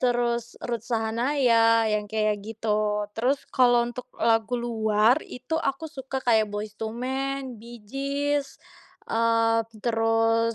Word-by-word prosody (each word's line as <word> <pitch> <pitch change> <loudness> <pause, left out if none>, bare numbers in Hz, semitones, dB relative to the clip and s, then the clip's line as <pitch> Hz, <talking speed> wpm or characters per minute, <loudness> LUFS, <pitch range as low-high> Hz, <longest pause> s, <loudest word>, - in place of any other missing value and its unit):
Terus 240 -1 0
Ruth 235 -2 -3
Sahanaya, 230 0 +3
yang 210 0 0
kayak 215 -1 +1
gitu. 210 -1 -1
Terus 270 +4 +1
kalau 245 -2 +4
untuk 250 +1 -7
lagu 225 +1 +2
luar, 225 +1 +2
itu 255 +6 -4
aku 275 0 -2
suka 265 -2 -5
kayak 220 -3 +4
Boyz 205 0 -5
II 220 0 -3
Man, 265 0 -3
Bee 235 -1 -11
Gees, 280 +3 -2 0.5
eee, 230 0 +3 0.2
terus 225 0 +2
230 Hz, 125 wpm, -26 LUFS, 225-255 Hz, 0.5 s, kalau